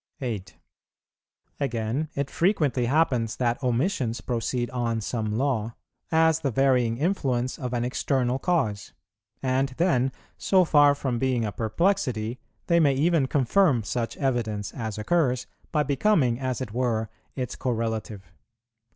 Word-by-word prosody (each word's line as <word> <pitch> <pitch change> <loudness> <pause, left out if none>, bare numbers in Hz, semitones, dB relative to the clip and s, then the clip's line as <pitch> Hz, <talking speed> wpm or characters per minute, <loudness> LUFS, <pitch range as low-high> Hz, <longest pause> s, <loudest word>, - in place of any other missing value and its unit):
8. 110 -8 -5 1.0
Again, 130 +2 -1
it 140 0 -2
frequently 150 - +1
happens 125 -6 +1
that 120 0 0
omissions 125 - 0
proceed 120 0 -2
on 120 -2 -1
some 110 -1 -2
law, 120 -4 -1 0.4
as 160 -1 +4
the 145 -4 -1
varying 125 -3 +2
influence 130 -6 -1
of 125 -2 -4
an 120 -1 -1
external 125 0 0
cause; 130 - -1 0.5
and 130 +1 +1
then, 135 -7 +2 0.3
so 185 -2 +4
far 145 -2 +5
from 130 -4 -2
being 125 -3 +1
a 105 - -2
perplexity, 120 - 0 0.3
they 170 -1 +3
may 145 -4 +4
even 155 0 +2
confirm 135 - +3
such 115 +2 -3
evidence 110 -7 -1
as 110 -4 -4
occurs, 125 +1 +1 0.3
by 150 -2 +2
becoming, 140 - +2
as 130 -2 -2
it 125 -5 -4
were, 115 -3 0 0.3
its 125 -3 -3
correlative. 110 -6 -3
125 Hz, 135 wpm, -26 LUFS, 115-145 Hz, 1.0 s, far